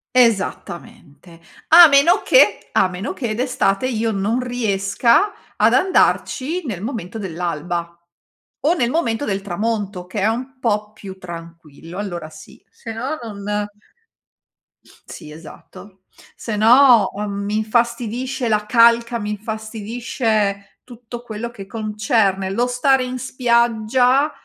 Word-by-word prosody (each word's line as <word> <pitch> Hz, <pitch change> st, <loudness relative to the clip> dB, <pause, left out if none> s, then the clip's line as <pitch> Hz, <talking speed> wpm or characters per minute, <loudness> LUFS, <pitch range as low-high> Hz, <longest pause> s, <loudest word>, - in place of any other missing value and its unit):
Esattamente, 180 Hz, -, -1 dB, 0.3 s
a 340 Hz, +1 st, +9 dB
meno 290 Hz, +6 st, +4 dB
che, -, -, +4 dB
a 185 Hz, -, +2 dB
meno 185 Hz, +3 st, -5 dB
che, 230 Hz, -4 st, -3 dB
d'estate 245 Hz, -3 st, 0 dB
io 225 Hz, -2 st, -1 dB
non 210 Hz, +4 st, -1 dB
riesca 235 Hz, -, +1 dB, 0.2 s
ad -, -, +3 dB
andarci 350 Hz, -3 st, +1 dB
nel 200 Hz, -8 st, -5 dB
momento 225 Hz, -3 st, -5 dB
dell'alba, 170 Hz, -2 st, -4 dB, 0.7 s
o 310 Hz, +4 st, +3 dB
nel 245 Hz, -9 st, 0 dB
momento 255 Hz, -5 st, -1 dB
del 195 Hz, -4 st, -2 dB
tramonto, 200 Hz, -1 st, -3 dB
che 195 Hz, +2 st, -4 dB
è -, -, +1 dB
un 255 Hz, +4 st, -4 dB
po' 210 Hz, -3 st, -1 dB
più 195 Hz, -3 st, -10 dB
tranquillo, 165 Hz, -1 st, -10 dB
allora 175 Hz, -6 st, -5 dB
sì. 155 Hz, 0 st, -15 dB
Sennò 240 Hz, +7 st, -5 dB
non 205 Hz, -2 st, -4 dB, 1.4 s
sì 150 Hz, -, -10 dB
esatto, 185 Hz, +4 st, -14 dB, 0.3 s
sennò, 230 Hz, 0 st, +4 dB
uhm, 205 Hz, 0 st, -4 dB
mi 210 Hz, +1 st, -1 dB
infastidisce 235 Hz, +3 st, -1 dB
la 210 Hz, -1 st, 0 dB
calca, 235 Hz, +1 st, +4 dB
mi 210 Hz, -1 st, -4 dB
infastidisce 220 Hz, -1 st, -3 dB
tutto 240 Hz, -1 st, -10 dB
quello 230 Hz, 0 st, -6 dB
che 200 Hz, -5 st, -10 dB
concerne 210 Hz, -2 st, 0 dB
lo 240 Hz, +5 st, 0 dB
stare 255 Hz, +1 st, +2 dB
in 255 Hz, 0 st, -5 dB
spiaggia, 245 Hz, +2 st, +2 dB
220 Hz, 120 wpm, -19 LUFS, 195-245 Hz, 1.4 s, a